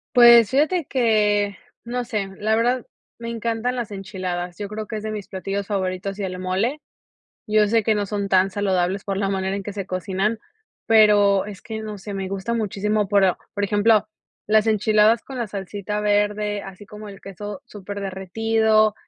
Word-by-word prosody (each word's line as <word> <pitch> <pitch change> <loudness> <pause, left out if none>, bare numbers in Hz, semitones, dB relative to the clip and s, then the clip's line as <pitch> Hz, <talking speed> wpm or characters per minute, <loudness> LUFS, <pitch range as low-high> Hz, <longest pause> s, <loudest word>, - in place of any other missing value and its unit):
Pues, 235 -2 +8
fíjate 310 +5 +1
que, 210 -6 +2 0.3
no 245 +1 -3
sé, 215 -5 -3
la 215 +1 +1
verdad 240 +2 +1 0.3
me 230 0 -5
encantan 230 +1 -2
las 235 -4 -4
enchiladas. 185 -3 -5
Yo 205 - -4
creo 215 +1 -6
que 220 - -5
es 210 - -7
de 215 - -3
mis 210 -2 -6
platillos 195 +1 -4
favoritos 190 -1 -2
y 205 - -4
el 185 -1 -4
mole. 195 +11 -1 0.7
Yo 215 -1 +3
sé 225 +2 +2
que 220 +1 +2
no 205 -1 0
son 200 0 -3
tan 190 0 +3
saludables 190 -1 0
por 195 -2 -2
la 195 0 0
manera 190 0 -1
en 200 - -4
que 205 - -6
se 195 -2 -5
cocinan, 190 +4 -1 0.5
pero, 205 -3 +5
es 205 -3 -9
que 220 -1 -6
no 215 -1 -6
sé, 205 +1 -8
me 195 -1 -4
gusta 195 +4 -3
muchísimo, 210 -2 0
pero 195 -2 +3 0.2
por 205 - 0
ejemplo 210 +1 +3 0.4
las 215 +1 +3
enchiladas 215 +1 +3
con 265 -2 -8
la 235 - -1
salsita 205 +1 -4
verde, 210 0 +1
así 195 +1 -10
como 210 +1 -10
el 195 -1 -12
queso 205 +6 -8
súper 200 -3 -8
derretido 215 +3 +1
205 Hz, 185 wpm, -22 LUFS, 195-220 Hz, 0.7 s, Pues